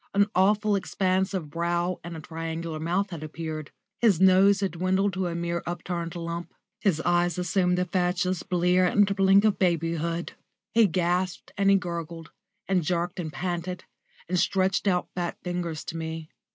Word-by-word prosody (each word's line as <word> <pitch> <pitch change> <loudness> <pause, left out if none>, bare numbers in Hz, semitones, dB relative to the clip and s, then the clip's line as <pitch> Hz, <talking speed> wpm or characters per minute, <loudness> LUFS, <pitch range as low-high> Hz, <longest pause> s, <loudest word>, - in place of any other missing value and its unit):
An 200 0 +5
awful 205 +3 +3
expanse 190 0 0
of 170 -7 -4
brow 170 +2 -1
and 170 -1 -6
a - - -8
triangular 165 0 -5
mouth 180 +5 -1
had 165 -3 -6
appeared; 155 -1 -5 0.3
his 210 -8 +4
nose 190 +1 +5
had 195 - 0
dwindled 190 +3 +1
to 185 0 -1
a 170 - -3
mere 170 0 -2
upturned 175 -1 -4
lump, 170 0 -5 0.2
his 185 -7 +1
eyes 175 0 +1
assumed 180 0 +1
the 180 - +1
fatuous 180 0 0
blear 180 +1 +2
and 200 +1 +3
blink 195 +1 +5
of 215 - +2
babyhood; 170 -1 0 0.4
he 225 -1 +6
gasped 180 0 -1
and 195 -1 +2
he 200 - +6
gurgled, 170 -3 -4 0.4
and 190 -2 +2
jerked 175 +3 -1
and 160 -3 -4
panted, 180 +1 -3 0.4
and 180 +1 0
stretched 190 +2 +1
out 180 -2 +1
fat 175 -1 -3
fingers 175 -3 -3
to 165 - -6
me. 160 -1 -5
175 Hz, 165 wpm, -26 LUFS, 170-190 Hz, 0.4 s, he